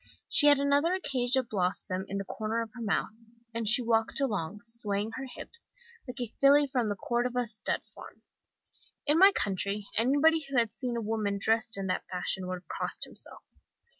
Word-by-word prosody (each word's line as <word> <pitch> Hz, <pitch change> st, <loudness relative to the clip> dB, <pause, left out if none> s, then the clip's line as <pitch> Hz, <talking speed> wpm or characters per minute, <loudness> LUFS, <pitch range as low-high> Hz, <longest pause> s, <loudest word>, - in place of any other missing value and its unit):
She 295 Hz, -, +5 dB
had 290 Hz, -1 st, +7 dB
another 285 Hz, +5 st, +2 dB
acacia 260 Hz, -7 st, 0 dB
blossom 185 Hz, -3 st, -2 dB
in 195 Hz, -, -4 dB
the 195 Hz, -, -4 dB
corner 220 Hz, +3 st, -2 dB
of 225 Hz, -, -11 dB
her 245 Hz, -, -9 dB
mouth, 215 Hz, -1 st, 0 dB, 0.4 s
and 225 Hz, -2 st, 0 dB
she 240 Hz, +2 st, +5 dB
walked 225 Hz, +1 st, +1 dB
along, 205 Hz, -7 st, -2 dB
swaying 220 Hz, -2 st, -1 dB
her 265 Hz, +3 st, -5 dB
hips, 465 Hz, -, -7 dB, 0.4 s
like 250 Hz, +1 st, -7 dB
a 240 Hz, -2 st, -4 dB
filly 285 Hz, +1 st, +6 dB
from 250 Hz, -5 st, -1 dB
the 205 Hz, -, -1 dB
Cordova 245 Hz, +4 st, -1 dB
stud 215 Hz, -1 st, 0 dB
farm. -, -, -14 dB, 0.8 s
In 300 Hz, +3 st, +3 dB
my 390 Hz, +2 st, +9 dB
country 200 Hz, -, -2 dB
anybody 290 Hz, +8 st, +4 dB
who 275 Hz, -, -1 dB
had 230 Hz, -3 st, +2 dB
seen 245 Hz, -3 st, -3 dB
a -, -, -2 dB
woman 210 Hz, -2 st, -1 dB
dressed 225 Hz, +2 st, +2 dB
in 195 Hz, -, -3 dB
that 185 Hz, -, -2 dB
fashion 185 Hz, +1 st, -3 dB
would 185 Hz, -, -2 dB
have -, -, -48 dB
crossed -, -, -4 dB
himself. -, -, -5 dB
230 Hz, 185 wpm, -29 LUFS, 205-265 Hz, 0.8 s, my